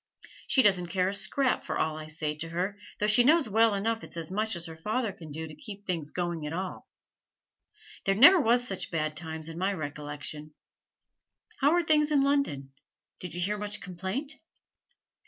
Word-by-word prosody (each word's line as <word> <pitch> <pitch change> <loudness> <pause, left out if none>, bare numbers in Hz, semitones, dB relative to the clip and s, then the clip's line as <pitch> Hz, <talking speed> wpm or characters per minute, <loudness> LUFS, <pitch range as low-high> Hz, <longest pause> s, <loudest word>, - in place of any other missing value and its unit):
She 260 - +4
doesn't 185 -4 +3
care 185 +1 +1
a - - -3
scrap 225 +7 +1
for - - -3
all 155 -1 0
I 155 0 -7
say 155 -1 -3
to 165 +1 -3
her, 180 +4 -2 0.2
though 210 - 0
she 215 +3 +6
knows 305 +2 +4
well 220 0 +3
enough 225 +3 -1
it's - - -8
as 165 +1 -4
much 215 +1 -1
as 170 -1 -2
her 160 -2 -8
father 215 +7 -2
can 160 -4 -11
do 160 +2 -5
to 155 - -11
keep 205 - -10
things 165 -6 -3
going 175 -2 -3
at 150 - -5
all. 185 +2 -5 1.2
There 195 - +2
never 345 - +9
was 245 0 +3
such 190 - -3
bad 155 -2 -2
times 160 -1 -4
in 165 +1 -7
my 190 +2 +1
recollection! 150 -1 -6 1.0
How 290 +3 +4
are 350 - +2
things 305 -2 +3
in 285 -2 +4
London? 275 - 0 0.5
Did 180 -2 -6
you 175 - -3
hear 205 +3 -1
much 210 0 -2
complaint?' 190 - -5
190 Hz, 195 wpm, -28 LUFS, 160-225 Hz, 1.2 s, never